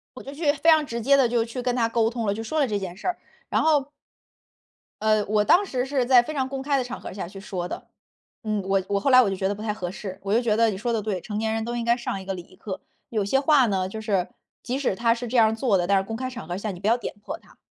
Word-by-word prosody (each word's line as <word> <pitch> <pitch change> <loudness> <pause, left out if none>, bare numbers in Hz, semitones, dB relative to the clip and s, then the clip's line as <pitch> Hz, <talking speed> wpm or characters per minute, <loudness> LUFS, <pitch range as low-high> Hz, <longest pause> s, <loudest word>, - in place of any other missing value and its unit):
我 - - -9
就 275 - -8
去 295 -1 +2
非 325 +2 +2
常 315 -1 +5
直 235 -4 -4
接 275 +4 +5
地 260 -4 +4
就 235 -1 +1
去 245 +2 -5
跟 245 0 0
他 230 -2 +2
沟 230 -1 +2
通 230 -2 -3
了， 200 - +1
就 220 - -5
说 310 +7 -2
了 275 - +3
这 205 -2 -1
件 185 -1 -6
事 240 - -6
儿。 360 - 0 0.3
然 - - +1
后 290 -3 +2 1.1
呃， 215 -1 +3
我 210 0 +2
当 380 +4 +5
时 255 -6 -2
是 265 -3 0
在 245 -1 +6
非 310 - -5
常 265 -2 -1
公 270 -1 -4
开 280 0 +1
的 255 - +1
场 245 - -6
合 - - -8
下 190 -3 -5
去 195 +1 -10
说 180 -3 -4
的。 - - -7 0.6
嗯， 215 -2 -1
我 195 -1 +1
我 200 0 +1
后 275 - +1
来 255 0 +9
我 210 - +2
就 195 - -2
觉 190 0 -1
得 200 - 0
不 210 - -9
太 215 -1 -1
合 180 -4 -5
适， 190 -1 -7
我 200 +1 -1
就 235 - +4
觉 220 -3 +1
得 230 0 +4
你 190 - -3
说 235 +3 -2
得 220 - 0
对， 195 -4 -3
成 210 -1 -5
年 220 0 0
人 225 0 -1
都 240 0 -3
应 235 - -2
该 235 0 +4
上 200 -5 -3
一 - - -11
个 195 - -2
礼 180 - -6
仪 - - -19
课。 190 -3 -7 0.3
有 215 -3 0
些 270 +7 +2
话 280 -2 +5
呢， 190 -2 0
就 220 +2 -6
是， 195 -5 0 0.3
即 260 +2 -2
使 250 -9 0
他 230 +1 +3
是 240 +1 -5
这 245 +2 0
样 220 -1 +7
儿 220 - -2
做 225 -4 +2
的， 175 - 0
但 200 -1 +4
是 190 - +1
公 225 +3 -5
开 255 +2 -3
场 245 -1 -8
合 175 +1 -3
下 210 0 -3
你 180 - -9
不 200 - -2
要 235 +2 +4
点 - - -5
破 310 +3 -5
他。 - - -22
225 Hz, 345 characters per minute, -25 LUFS, 200-255 Hz, 1.1 s, 来